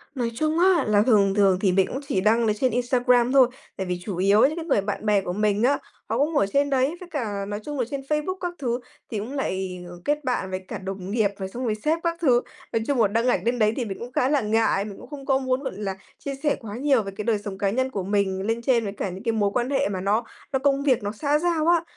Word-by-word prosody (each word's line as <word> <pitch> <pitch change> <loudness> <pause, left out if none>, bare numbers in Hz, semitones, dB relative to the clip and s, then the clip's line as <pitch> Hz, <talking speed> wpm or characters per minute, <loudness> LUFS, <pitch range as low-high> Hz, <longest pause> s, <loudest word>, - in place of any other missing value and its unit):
Nói 235 -2 -1
chung 310 +4 0
á 360 -4 +4
là 205 -1 +4
thường 205 -4 +4
thường 195 -3 +4
thì 190 -3 +3
mình 190 0 +3
cũng 265 - -4
chỉ 185 - 0
đăng 225 +2 +3
ở 215 - +3
trên 250 +3 0
Instagram 245 0 +2
thôi, 265 -2 +6 0.3
tại 190 - -2
vì 180 0 -2
chủ 195 -5 -4
yếu 200 +3 +4
những 305 +4 +4
cái 330 -1 -5
người 205 - +2
bạn 205 +2 -4
bè 205 -2 +3
của 180 - -4
mình 210 +2 +1
á, 280 +3 +4 0.3
họ - - 0
cũng 295 +2 +1
ở 200 - +4
trên 285 0 +3
đấy. 270 +4 +1
Với 360 -1 -11
cả 210 -9 -3
nói 205 0 -4
chung 290 -2 -4
là 245 - +1
trên 275 0 -3
Facebook 300 +6 -2
các 355 -1 -2
thứ 245 -2 -1 0.3
thì 220 - -2
cũng 230 +6 -6
lại 190 -9 -3 0.2
kết 295 0 0
bạn 245 -7 -1
với 185 0 -4
cả - - -5
đồng 190 0 -6
nghiệp 215 -2 +2
rồi 190 -1 -5
xong 250 +5 -6
rồi 220 -3 0
sếp 310 +9 0
các 335 -1 0
thứ. 245 -6 +4 0.3
Nói 225 - +1
chung 270 -5 +2
là 210 - +5
đăng 230 +4 0
ảnh - - +2
lên 240 +1 0
đấy 215 0 +3
thì 245 - -2
mình 195 -2 -6
cũng 240 +1 -7
khá 255 +1 +1
là 290 -2 +2
ngại. 215 -2 +1
Mình 200 -2 -8
cũng - - -13
không 285 -2 -8
có 265 -1 +3
muốn, 260 +1 -1
gọi - - -3
là, 195 -2 -3 0.2
chia 275 -1 -4
sẻ 295 - +2
quá 215 -4 -7
nhiều 270 -4 +2
về 195 - -6
cái 210 - -5
đời 225 -3 +2
sống 200 -2 -6
cá 200 -1 +1
nhân 260 +5 0
của 195 - -3
mình 190 -1 0
lên 225 +3 -1
trên 235 -1 +2
với 200 -2 -4
cả 195 - -3
những 190 +4 -8
cái 230 - +1
mối 205 -2 +1
quan 245 +1 0
hệ 275 - +1
mà 185 -2 -3
nó 210 +4 +1 0.3
nó 265 - +2
công 275 0 +2
việc, 255 -6 +2
nó 205 - -2
xã 290 +7 0
giao 335 -2 +1
á. 340 -1 +4
230 Hz, 290 wpm, -24 LUFS, 200-275 Hz, 0.3 s, thôi